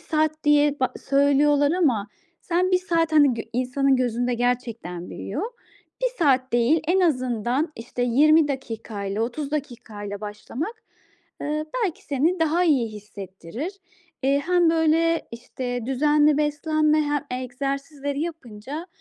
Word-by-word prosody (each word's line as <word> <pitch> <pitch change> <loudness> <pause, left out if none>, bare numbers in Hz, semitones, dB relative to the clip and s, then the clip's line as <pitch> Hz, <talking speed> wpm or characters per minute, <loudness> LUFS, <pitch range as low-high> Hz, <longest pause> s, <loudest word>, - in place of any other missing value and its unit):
saat 310 -1 -1
diye 295 -1 +3
ba 255 - +1 0.2
söylüyorlar 285 +1 +4
ama 250 - +1 0.3
sen 360 +2 0
1 365 - +5
saat, 335 -3 0
hani, 290 -5 +5
gö 225 - -4
insanın 255 +2 +1
gözünde 245 0 0
gerçekten 235 -7 -2
büyüyor. 260 - -5 0.6
1 - - +2
saat 265 -5 +2
değil 240 +7 +3
en 375 +2 +3
azından, 255 - 0
işte, 240 +2 -5
20 295 +5 +5
dakika 225 -6 -5
ile 200 +2 -2
30 275 +5 -3
dakika 240 -8 -5
ile 205 0 -5
başlamak, 290 - -6 0.6
ııı, 305 +1 -2 0.2
belki 350 - -4
seni 320 +6 0
daha 325 +3 +2
iyi 270 -8 +3
hissettirir. 205 - -7 0.5
Eee, 280 +1 +2
hem 350 -2 +4
böyle, 330 +1 +2
işte, 245 0 -5
düzenli 295 +2 +3
beslenme 305 +1 +2
he 290 -3 -2
egzersizleri 275 +2 -4
yapınca, 300 - -6
280 Hz, 135 wpm, -24 LUFS, 245-310 Hz, 0.6 s, 1